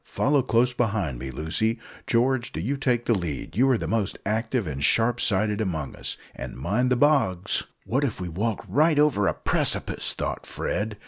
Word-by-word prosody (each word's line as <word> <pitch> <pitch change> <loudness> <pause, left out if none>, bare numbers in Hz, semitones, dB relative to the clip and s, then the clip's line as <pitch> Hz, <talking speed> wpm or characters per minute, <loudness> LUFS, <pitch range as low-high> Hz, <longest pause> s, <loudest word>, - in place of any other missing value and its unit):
Follow 140 0 +2
close 125 0 +2
behind 100 - -1
me, 65 +1 -5
Lucy. 80 - -1 0.3
George, 120 +1 +2
do - - -5
you 120 +12 -1
take 125 -4 0
the 115 - +3
lead 85 -4 -4
you 130 +5 +4
are 130 - +4
the 85 - -4
most 105 +1 0
active 110 +2 0
and 70 -3 -4
sharp 115 +8 +3
sighted 105 +2 +2
among 80 -9 -3
us; - - -5 0.2
and - - -7
mind 105 - 0
the 125 - +3
bogs." 125 - +2 0.2
"What 135 +4 0
if 130 -9 -1
we 90 - -4
walk 100 +6 -2
right 155 +1 +3
over 140 -10 +3
a - - +1
precipice!" - - 0
thought - - -4
Fred. 105 0 -2
110 Hz, 190 wpm, -25 LUFS, 95-125 Hz, 0.3 s, you